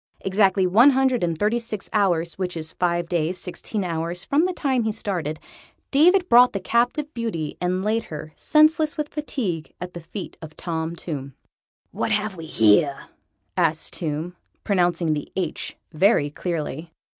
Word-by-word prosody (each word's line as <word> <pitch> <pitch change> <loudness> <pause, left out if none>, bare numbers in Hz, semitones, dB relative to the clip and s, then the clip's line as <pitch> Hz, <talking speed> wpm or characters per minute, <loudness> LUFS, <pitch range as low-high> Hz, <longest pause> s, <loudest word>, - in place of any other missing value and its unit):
Exactly 190 -1 +3
one 220 +10 +6
hundred 265 -4 +2
and 170 -2 0
thirty 215 +6 +1
six 220 -4 -5
hours 175 -5 +1
which 180 -2 -4
is 160 0 -5
five 175 -1 +1
days 170 +1 -1
sixteen 190 +4 -4
hours 170 0 -3
from 300 +5 +2
the 370 - 0
time 270 -7 0
he 220 -1 0
started 180 -8 -3 0.5
David 355 +6 +5
brought 245 -1 +7
the 200 - -1
captive 245 +9 0
beauty 215 -11 -3
and 180 +1 0
laid 220 +2 0
her, 155 0 -8
senseless 310 0 +3
with 300 -1 -2
fatigue, 215 - -3
at 180 0 -6
the 175 - -7
feet 185 +4 -8
of 155 -1 -10
Tom 165 -1 -3
Tomb. 140 -6 -6 0.6
"What - - -2
have 210 -1 0
we 165 -2 -8
here?" 115 +3 +3 0.5
asked 165 -3 +1
Tomb, 160 +2 -3 0.3
pronouncing 175 -5 +1
the 145 -1 -5
H 180 -5 -3 0.2
very 155 -3 +3
clearly. 160 -1 -4
180 Hz, 160 wpm, -23 LUFS, 165-230 Hz, 0.6 s, brought